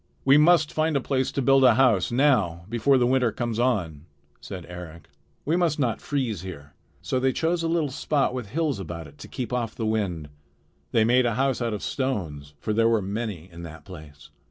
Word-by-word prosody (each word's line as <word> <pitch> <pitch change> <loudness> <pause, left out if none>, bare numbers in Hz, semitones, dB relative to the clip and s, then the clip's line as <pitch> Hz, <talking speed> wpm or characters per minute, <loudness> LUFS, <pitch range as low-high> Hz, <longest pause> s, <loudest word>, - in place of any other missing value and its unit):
"We 135 +1 +6
must 155 +1 +4
find 155 -1 +1
a - - +1
place 130 0 -1
to 140 - -2
build 135 +1 +5
a 125 -3 +6
house 120 -8 +3
now 110 - +2
before 120 +4 +3
the 125 - +3
winter 125 -2 +2
comes 120 -2 -3
on," 90 - -1 0.3
said 90 -3 -8
Eric. 85 -2 -10 0.4
"We 160 - +1
must 170 -4 +1
not 125 -6 -1
freeze 125 - -2
here." 75 -6 -9 0.3
So 130 - -1
they 130 +1 +2
chose 165 +5 0
a 165 - -1
little 165 -4 0
spot 140 0 0
with 125 -5 -5
hills 150 -4 -1
about 85 -3 -6
it 70 +1 -16
to - - -9
keep 125 -2 -5
off 120 -3 -2
the 115 - -3
wind. 95 -9 -2 0.6
They 110 - +3
made 120 +2 +3
a 115 - -1
house 135 -1 0
out 115 -2 -1
of 105 - -7
stones; 80 - -3
for 110 - -2
there 115 +1 +3
were 115 -1 +3
many 100 -4 -4
in 85 +1 -10
that 80 -1 -10
place. 75 -6 -12
115 Hz, 210 wpm, -25 LUFS, 90-135 Hz, 0.6 s, We